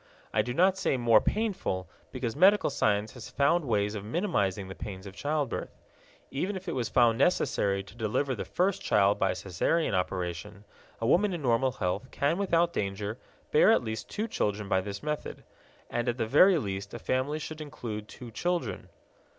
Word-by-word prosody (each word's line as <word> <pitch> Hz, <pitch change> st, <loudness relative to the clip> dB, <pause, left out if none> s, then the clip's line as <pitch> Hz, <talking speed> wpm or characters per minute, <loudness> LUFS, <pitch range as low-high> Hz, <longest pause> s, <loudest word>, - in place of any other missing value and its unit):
I -, -, +4 dB
do 125 Hz, -, -4 dB
not 185 Hz, +7 st, +3 dB
say 165 Hz, -8 st, +1 dB
more 115 Hz, -3 st, +5 dB
painful, 195 Hz, -, -1 dB, 0.2 s
because 125 Hz, -3 st, -3 dB
medical 190 Hz, +1 st, +5 dB
science 105 Hz, -6 st, +1 dB
has 125 Hz, -, -10 dB
found 145 Hz, +4 st, +2 dB
ways 105 Hz, -4 st, +1 dB
of 105 Hz, -2 st, -5 dB
minimizing 105 Hz, -, -1 dB
the 95 Hz, -, -7 dB
pains 95 Hz, 0 st, -8 dB
of 95 Hz, -1 st, -9 dB
childbirth. 145 Hz, 0 st, -2 dB, 0.5 s
Even 185 Hz, +9 st, -2 dB
if 190 Hz, 0 st, -7 dB
it 170 Hz, -, -2 dB
was 125 Hz, -3 st, -2 dB
found 120 Hz, -2 st, +4 dB
necessary 100 Hz, -, +2 dB
to 100 Hz, -, -15 dB
deliver 120 Hz, +5 st, 0 dB
the 115 Hz, -, -4 dB
first 195 Hz, +2 st, 0 dB
child 100 Hz, -, +3 dB
by -, -, +1 dB
Caesarean 95 Hz, -, 0 dB
operation, 95 Hz, +2 st, -3 dB, 0.3 s
a 115 Hz, -, -2 dB
woman 185 Hz, -, +3 dB
in 170 Hz, -4 st, -4 dB
normal 125 Hz, +1 st, +2 dB
health 95 Hz, +7 st, -2 dB
can 145 Hz, +7 st, 0 dB
without 170 Hz, -3 st, +2 dB
danger 100 Hz, +3 st, -3 dB, 0.3 s
bear -, -, +6 dB
at -, -, +3 dB
least 110 Hz, 0 st, -5 dB
two 215 Hz, +2 st, -2 dB
children 105 Hz, -, -1 dB
by 95 Hz, -1 st, +2 dB
this 100 Hz, +1 st, -6 dB
method. 150 Hz, 0 st, -4 dB, 0.4 s
And 120 Hz, +1 st, -1 dB
at 120 Hz, -, -2 dB
the 115 Hz, -, 0 dB
very 175 Hz, -, +6 dB
least 100 Hz, -4 st, -4 dB
a -, -, -3 dB
family 130 Hz, +5 st, -1 dB
should 155 Hz, 0 st, -6 dB
include 110 Hz, -8 st, -6 dB
two 120 Hz, 0 st, -10 dB
children. 175 Hz, +9 st, -2 dB
120 Hz, 185 wpm, -29 LUFS, 100-155 Hz, 0.5 s, bear